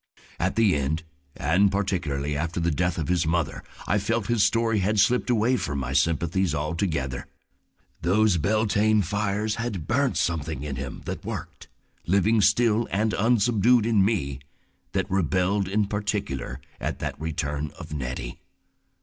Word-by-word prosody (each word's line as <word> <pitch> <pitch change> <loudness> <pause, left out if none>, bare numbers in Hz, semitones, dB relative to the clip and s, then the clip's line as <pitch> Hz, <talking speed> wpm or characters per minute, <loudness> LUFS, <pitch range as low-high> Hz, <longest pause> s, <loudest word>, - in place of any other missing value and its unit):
At 95 +2 0
the 110 -7 +4
end, 75 +4 -1 0.3
and 95 +5 +3
particularly 80 -8 -1
after 80 +4 -2
the 85 0 +1
death 90 +2 0
of 80 - -2
his 85 -2 +1
mother, 80 -3 -1 0.2
I 105 - +2
felt 115 +1 -1
his 120 -2 +2
story 115 -2 +2
had 105 +3 +1
slipped 125 +6 +3
away 120 +2 +3
from 70 - -3
my 65 -1 -3
sympathies 85 +4 +1
altogether. 75 -3 -2 0.7
Those 100 +2 +3
Beltane 110 +3 +2
fires 105 +3 -1
had 105 -9 -3
burnt 130 +2 +1
something 80 -4 -1
in 75 -2 -4
him 65 +1 -6
that - - -5
worked - - -7 0.4
living 100 +4 +3
still 110 +2 +3
and 105 +2 0
unsubdued 115 +1 +3
in 110 -4 +3
me, 70 - 0 0.5
that - - +1
rebelled 95 +1 +1
in 105 +2 +1
particular 100 - -3 0.2
at - - -3
that - - -5
return 75 -2 -3
of - - -8
Nettie. 65 -4 -5
95 Hz, 150 wpm, -25 LUFS, 75-110 Hz, 0.7 s, the